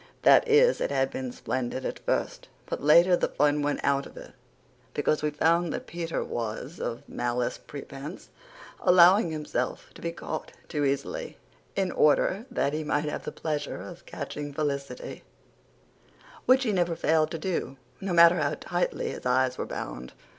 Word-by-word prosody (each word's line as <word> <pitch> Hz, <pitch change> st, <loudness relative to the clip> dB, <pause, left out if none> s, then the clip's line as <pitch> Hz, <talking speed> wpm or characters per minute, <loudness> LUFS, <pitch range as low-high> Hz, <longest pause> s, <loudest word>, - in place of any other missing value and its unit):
That -, -, +6 dB
is, 465 Hz, +2 st, +5 dB
it -, -, 0 dB
had 135 Hz, -1 st, +1 dB
been 130 Hz, -1 st, -4 dB
splendid 130 Hz, +1 st, -3 dB
at -, -, -3 dB
first; -, -, -2 dB, 0.2 s
but -, -, -4 dB
later 170 Hz, +5 st, +6 dB
the -, -, 0 dB
fun 145 Hz, +1 st, +2 dB
went 145 Hz, 0 st, -1 dB
out 140 Hz, 0 st, +1 dB
of -, -, -16 dB
it -, -, -10 dB, 0.6 s
because 155 Hz, -, +1 dB
we 150 Hz, -, +1 dB
found 165 Hz, +3 st, +2 dB
that -, -, -5 dB
Peter 170 Hz, -1 st, -3 dB
was, 120 Hz, +7 st, -5 dB
of 115 Hz, -, -4 dB
malice 120 Hz, 0 st, -2 dB
prepense, 140 Hz, +3 st, -9 dB, 0.5 s
allowing 180 Hz, +1 st, +6 dB
himself 150 Hz, -5 st, -3 dB
to -, -, -13 dB
be 170 Hz, -, -2 dB
caught -, -, -6 dB
too 150 Hz, -3 st, -1 dB
easily, 140 Hz, -, -2 dB, 0.4 s
in 190 Hz, -2 st, 0 dB
order 190 Hz, -, +2 dB
that 140 Hz, -, 0 dB
he 155 Hz, +1 st, -2 dB
might 150 Hz, 0 st, 0 dB
have 150 Hz, -, -4 dB
the -, -, -3 dB
pleasure 150 Hz, -2 st, -3 dB
of 175 Hz, -1 st, -10 dB
catching 145 Hz, 0 st, -5 dB
Felicity 145 Hz, -, -4 dB, 1.2 s
which 260 Hz, +1 st, +6 dB
he 225 Hz, -, +1 dB
never 175 Hz, -3 st, +1 dB
failed 155 Hz, -1 st, +2 dB
to 165 Hz, -, -4 dB
do, 160 Hz, -5 st, -3 dB, 0.2 s
no 195 Hz, -1 st, -3 dB
matter 170 Hz, 0 st, +7 dB
how 150 Hz, -2 st, 0 dB
tightly 175 Hz, 0 st, -1 dB
his -, -, -5 dB
eyes 130 Hz, 0 st, +2 dB
were -, -, -2 dB
bound. 65 Hz, +1 st, -6 dB
150 Hz, 170 wpm, -27 LUFS, 140-175 Hz, 1.2 s, matter